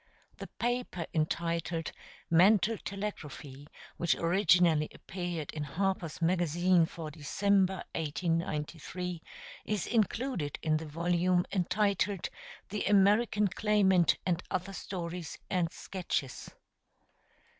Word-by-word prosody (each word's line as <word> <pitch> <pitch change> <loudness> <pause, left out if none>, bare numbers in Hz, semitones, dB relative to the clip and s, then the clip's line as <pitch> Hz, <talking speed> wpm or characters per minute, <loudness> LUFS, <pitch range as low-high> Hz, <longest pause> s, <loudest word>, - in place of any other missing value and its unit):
[The - - -6
paper 240 -8 -1
entitled 165 +1 -1 0.4
"Mental 200 +5 +5
Telegraphy," 155 -8 -6 0.3
which 170 - +2
originally 170 -3 +3
appeared 175 -4 -5
in 155 - -4
Harper's 165 +2 -2
Magazine 175 0 +3
for 160 -2 -7
December, 190 +5 +1
1893, 165 +2 -2 0.4
is 210 -4 -1
included 225 - 0
in 155 -1 +2
the 160 0 -6
volume 175 +3 +1
entitled 200 0 0 0.4
The 210 +1 -2
American 205 +2 +4
Claimant 190 -3 +3
and 180 -1 +1
Other 185 +2 -2
Stories 175 -3 -5
and 175 -3 +1
Sketches. 175 -8 -4
175 Hz, 95 wpm, -31 LUFS, 165-195 Hz, 0.4 s, Mental